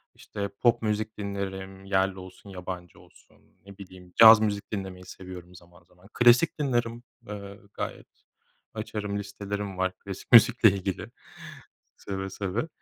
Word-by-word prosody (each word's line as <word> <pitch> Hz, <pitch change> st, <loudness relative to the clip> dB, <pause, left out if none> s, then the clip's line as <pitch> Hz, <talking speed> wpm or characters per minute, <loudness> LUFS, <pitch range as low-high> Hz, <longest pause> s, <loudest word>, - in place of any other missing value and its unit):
işte, 100 Hz, -1 st, -5 dB
pop 120 Hz, -2 st, +3 dB
müzik 110 Hz, 0 st, -2 dB
dinlerim, 95 Hz, -1 st, -5 dB
yerli 95 Hz, -1 st, 0 dB
olsun, 95 Hz, +2 st, -12 dB
yabancı 90 Hz, -2 st, -8 dB
olsun, -, -, -22 dB, 0.3 s
ne 100 Hz, -1 st, -13 dB
bileyim, 90 Hz, -2 st, -13 dB
caz 110 Hz, -1 st, +10 dB
müzik 100 Hz, -2 st, -2 dB
dinlemeyi 95 Hz, -3 st, -6 dB
seviyorum 90 Hz, -1 st, -11 dB
zaman, 85 Hz, 0 st, -18 dB
zaman. 90 Hz, +2 st, -22 dB
Klasik 120 Hz, +8 st, +4 dB
dinlerim, 120 Hz, -4 st, -1 dB, 0.2 s
eee, 100 Hz, -1 st, -8 dB
gayet -, -, -6 dB, 0.7 s
açarım 105 Hz, -2 st, -4 dB
listelerim 100 Hz, -1 st, -5 dB
var 95 Hz, 0 st, 0 dB
klasik 100 Hz, -1 st, -9 dB
müzikle 115 Hz, -1 st, +8 dB
ilgili. 95 Hz, -1 st, -4 dB, 0.9 s
Seve, 95 Hz, -1 st, -5 dB
seve. 100 Hz, -, -3 dB
100 Hz, 130 wpm, -27 LUFS, 95-105 Hz, 0.9 s, caz